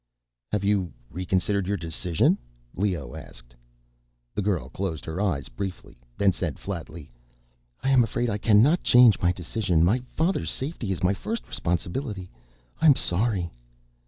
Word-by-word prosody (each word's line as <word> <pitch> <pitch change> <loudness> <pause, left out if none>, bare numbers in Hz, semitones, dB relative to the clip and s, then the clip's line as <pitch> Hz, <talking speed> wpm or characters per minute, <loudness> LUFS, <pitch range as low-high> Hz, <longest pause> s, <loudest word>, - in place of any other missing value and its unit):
"Have 105 -2 0
you 100 -3 +1 0.2
reconsidered 95 +2 0
your 100 +1 0
decision?" 85 0 +1 0.4
Leoh 90 -10 -1
asked. - - -10 0.8
The 105 - -1
girl 95 -10 0
closed 80 +1 -4
her 80 +4 -3
eyes 85 -10 0
briefly, 90 +10 -6 0.2
then 100 -1 +4
said 85 -5 -3
flatly, 85 -6 -7 0.7
"I 135 - +2
am 130 -2 +6
afraid 120 +2 -1
I 105 -2 -1
cannot 115 - +5
change 125 -5 +6
my 90 - +3
decision. 90 -1 0
My 105 +9 +3 0.2
father's 170 +5 +1
safety 130 -7 -3
is 95 - -3
my 95 +2 +4
first 225 - -4
responsibility. 90 - -3 0.5
I 160 - +5
am 145 - +8
sorry." 95 -3 0
95 Hz, 145 wpm, -26 LUFS, 85-110 Hz, 0.8 s, am